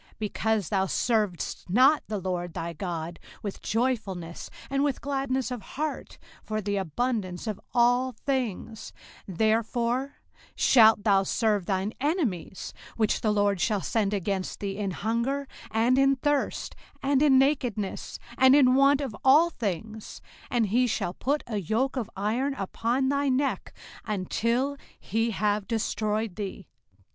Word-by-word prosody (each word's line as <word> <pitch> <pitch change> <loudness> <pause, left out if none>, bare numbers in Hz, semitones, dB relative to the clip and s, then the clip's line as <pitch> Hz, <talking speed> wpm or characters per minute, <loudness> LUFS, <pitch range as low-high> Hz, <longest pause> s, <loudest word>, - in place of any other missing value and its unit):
05:028:047 - - -28
Because 215 -2 -1
thou 190 -1 +1
servedst 210 -6 -1
not 260 - +5
the 215 - -2
LORD 175 -2 -3
thy 170 +1 -4
God 170 -1 -5 0.2
with 200 -2 -5
joyfulness, 210 -8 -2 0.2
and 275 0 +1
with 285 -3 0
gladness 270 -3 -2
of 245 -3 -4
heart, 300 +8 -5 0.2
for 215 0 -3
the 205 -1 -2
abundance 195 - -2
of 215 -3 -4
all 245 +1 +3
things; 230 -4 -3 0.4
05:028:048 180 - -7
Therefore 235 +4 +1 0.4
shalt 220 -4 +6
thou 200 -2 +4
serve 205 -2 0
thine 195 +2 -1
enemies 275 - -2 0.2
which 215 -2 +1
the 215 - +1
LORD 205 -3 +1
shall 200 +5 +1
send 210 -1 0
against 195 -1 -2
thee, 195 -1 -3
in 200 -1 -2
hunger, 235 +8 -1 0.2
and 235 +4 +2
in 275 0 +4
thirst, 290 +2 -1 0.3
and 275 0 +2
in 285 -3 +6
nakedness, 255 -7 0 0.2
and 260 +1 +7
in 255 -3 +6
want 275 +1 +4
of 260 -7 -4
all 305 +6 +6
things: 215 - -5 0.3
and 230 -4 +1
he 250 +4 +3
shall 175 -6 -1
put 285 +8 -1
a 220 -3 -3
yoke 225 - 0
of 245 -5 -3
iron 235 +8 -1
upon 235 +5 -1
thy 280 0 +1
neck, 270 +2 0 0.3
until 230 +7 -1 0.2
he 225 +2 -1
have 205 -1 0
destroyed 215 -2 -1
thee. 195 -2 -5
225 Hz, 145 wpm, -27 LUFS, 200-260 Hz, 0.4 s, and